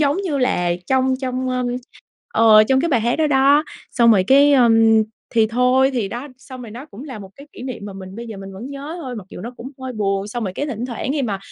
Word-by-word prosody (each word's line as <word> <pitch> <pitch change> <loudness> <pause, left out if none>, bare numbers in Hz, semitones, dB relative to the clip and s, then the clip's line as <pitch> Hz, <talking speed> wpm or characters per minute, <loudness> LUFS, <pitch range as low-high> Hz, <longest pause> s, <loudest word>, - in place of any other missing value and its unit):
giống 290 +2 +2
như 300 -7 -1
là, 180 -9 +1 0.2
trong 260 0 +2
trong, 255 0 -2
ơm, 250 -1 -1 0.7
ờ, 215 -1 +7
trong 265 +3 +2
cái 335 - 0
bài 250 -6 +2
hát 235 +2 0
đó 315 -1 +2
đó. 285 +2 +4 0.3
Xong 235 -2 +4
rồi, 190 -3 +3
cái, 285 +2 +6
ơ, 250 -4 +5 0.6
thì 225 -2 +3
thôi 250 +3 +3
thì 225 -6 -1
đó, 245 +7 -6
xong 260 -1 -11
rồi 225 - -9
nó 250 +7 -9
cũng 250 +2 -11
là 255 -7 -8
một 195 -1 -11
cái 280 +1 -13
kỷ - - -10
niệm 255 -6 -6
mà 200 - -7
mình 190 0 -10
bây 235 0 -7
giờ 220 -3 -8
mình 195 0 -9
vẫn 210 +7 -8
nhớ 285 +5 -7
thôi, 255 -2 -6
mặc 195 -3 -8
dù - - -9
nó 230 - -6
cũng 260 +3 -8
hơi 260 -1 -5
buồn. 200 -2 -1
Xong 240 +1 -4
rồi 185 - -3
cái 290 - -3
thỉnh 245 -2 -4
thoảng 250 +2 -4
khi 290 -2 -1
mà 200 -5 -2
250 Hz, 265 wpm, -20 LUFS, 215-270 Hz, 0.7 s, ờ